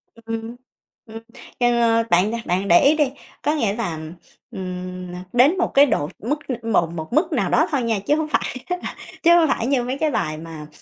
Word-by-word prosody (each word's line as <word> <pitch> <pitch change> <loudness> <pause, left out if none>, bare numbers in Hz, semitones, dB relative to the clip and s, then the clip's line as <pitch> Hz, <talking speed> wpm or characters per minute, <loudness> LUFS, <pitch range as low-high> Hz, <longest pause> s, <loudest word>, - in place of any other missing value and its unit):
Ừm, 225 +1 -6 0.5
ừm, 225 0 -9 0.4
ờ, 235 -2 +3
bạn 180 +4 +3
đ 235 - -2
bạn 185 +3 0
để 175 -2 +7
ý 285 +3 +5
đi, 295 -4 +1 0.3
có 300 +1 +1
nghĩa 220 -9 0
là, 175 -9 -3 0.5
ừm, 180 -1 -6
nà 180 +1 -7
đến 270 +9 +5
một 365 - 0
cái 280 +1 +7
độ 145 - -1
mức 285 +8 -2 0.2
một 195 -7 +2
một 160 +5 -6
mức 310 +5 +2
nào - - 0
đó - - +3
thôi 275 -4 0
nha, 225 -3 0
chứ 245 +10 +1
hông 315 0 -1
phải 300 - -1
là 360 0 -4 0.3
chứ 340 +1 +7
hông 335 -2 +5
phải 240 -4 0
như 270 -3 +1
mấy 255 +2 -3
cái 310 0 0
bài 155 - -1
mà, 160 -1 -9
230 Hz, 210 wpm, -22 LUFS, 180-280 Hz, 0.5 s, để